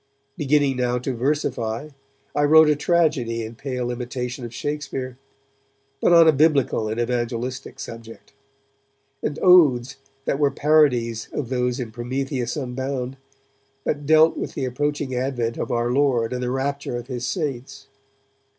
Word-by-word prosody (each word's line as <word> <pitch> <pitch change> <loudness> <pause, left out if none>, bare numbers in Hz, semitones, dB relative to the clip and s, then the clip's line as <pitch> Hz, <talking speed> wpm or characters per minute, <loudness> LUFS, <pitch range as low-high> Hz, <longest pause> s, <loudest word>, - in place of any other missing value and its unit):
Beginning 145 -2 +2
now 125 -1 0
to 125 +2 -3
versify, 125 -1 -2 0.5
I 145 - +2
wrote 155 +1 +7
a - - +2
tragedy 145 -8 +1
in 110 +1 -7
pale 125 0 -4
imitation 125 +1 -5
of 120 - -6
Shakespeare, 135 -1 -4 0.8
but - - +3
on 170 -1 +7
a - - +8
Biblical 140 -7 +2
and 110 +2 -3
evangelistic 120 +2 -3
subject; 115 +2 -10 0.9
and 150 - -2
odes 140 -8 +5 0.3
that 140 - 0
were 145 -1 +4
parodies 130 -8 +2
of 130 -5 -3
those 125 0 -1
in 120 -3 -5
'Prometheus 125 +2 -3
Unbound', 130 0 -4 0.7
but 145 -1 -2
dealt 160 +1 +5
with - - -5
the 135 - -2
approaching 145 +1 -2
advent 125 -2 -2
of - - -3
our 120 0 0
Lord 125 -4 +2
and 125 - -3
the 125 - -1
rapture 135 0 -2
of 120 - -7
His 125 -1 -4
saints. 135 -5 -4
130 Hz, 145 wpm, -23 LUFS, 120-145 Hz, 0.9 s, a